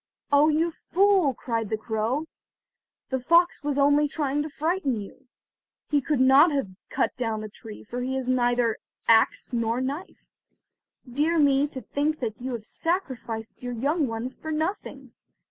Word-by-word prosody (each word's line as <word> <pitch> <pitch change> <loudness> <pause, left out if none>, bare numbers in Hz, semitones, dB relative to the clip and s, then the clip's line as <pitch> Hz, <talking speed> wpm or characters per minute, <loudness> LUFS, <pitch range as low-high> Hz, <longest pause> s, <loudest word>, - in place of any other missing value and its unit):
Oh, 285 +2 +5
you 320 +2 +1
fool," 370 -4 +2
cried 225 -3 -3
the 220 - -1
crow, 225 +7 -2 0.9
"the 260 - 0
fox 340 +7 +3
was 290 -1 -2
only 290 +1 +4
trying 290 -1 -1
to 305 - -4
frighten 310 -2 -1
you. 230 +6 -11 0.6
He 290 -1 +3
could 290 0 0
not 270 +5 +6
have 275 -8 -1 0.2
cut - - 0
down 225 -3 -2
the 215 - -6
tree, 215 +1 -11
for 245 +3 -5
he 260 +1 -2
has 260 -1 -3
neither 245 -2 +2 0.3
axe 225 +3 +3
nor 230 0 0
knife. 280 +8 -5 0.8
Dear 300 +7 +1
me, 285 -1 +4
to 270 -3 -7
think 295 +6 -1
that 230 -2 -4
you 255 0 -3
have 225 -3 -5
sacrificed 255 - -3
your 245 -1 -4
young 285 +6 0
ones 230 +3 -4
for 315 - -6
nothing! 315 +6 -3
270 Hz, 165 wpm, -26 LUFS, 240-305 Hz, 0.9 s, not